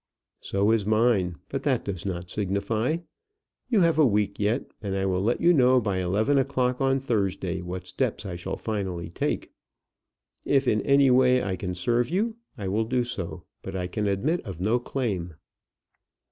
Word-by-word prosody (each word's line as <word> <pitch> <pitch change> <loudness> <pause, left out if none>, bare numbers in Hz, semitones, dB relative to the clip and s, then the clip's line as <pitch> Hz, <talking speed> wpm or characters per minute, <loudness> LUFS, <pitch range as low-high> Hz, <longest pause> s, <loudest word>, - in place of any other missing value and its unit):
"So 100 +2 +1
is 115 -2 +2
mine; 110 -4 +2
but - - -3
that - - 0
does 95 -2 -4
not 90 -2 -4
signify. 105 - 0 0.7
You 225 -6 +3
have 165 -2 +3
a - - +7
week 105 -2 0
yet, 105 +6 0
and 100 -2 -3
I 95 0 0
will 95 -1 0
let 115 +5 +1
you 175 +1 +6
know 130 -3 +5
by 100 -5 -1
eleven 105 +10 +2
o'clock 125 -1 0
on 135 0 +2
Thursday 95 -7 -1
what 90 +1 -6
steps 105 +1 -2
I 95 -3 -4
shall 85 - -4
finally 95 -6 -4
take. - - -2 0.9
If 135 -2 +2
in 105 -3 +3
any 140 +1 +4
way 125 0 +4
I 95 -1 -1
can 90 0 -4
serve 120 +7 +1
you, 220 +6 0 0.2
I 100 -3 -4
will 105 +4 0
do 125 +2 +1
so; 105 -8 -5 0.2
but 95 - -7
I 90 -1 -2
can 105 +3 -2
admit 135 - 0 0.2
no 110 +6 +2
claim." 100 - -3
105 Hz, 175 wpm, -26 LUFS, 95-125 Hz, 0.9 s, a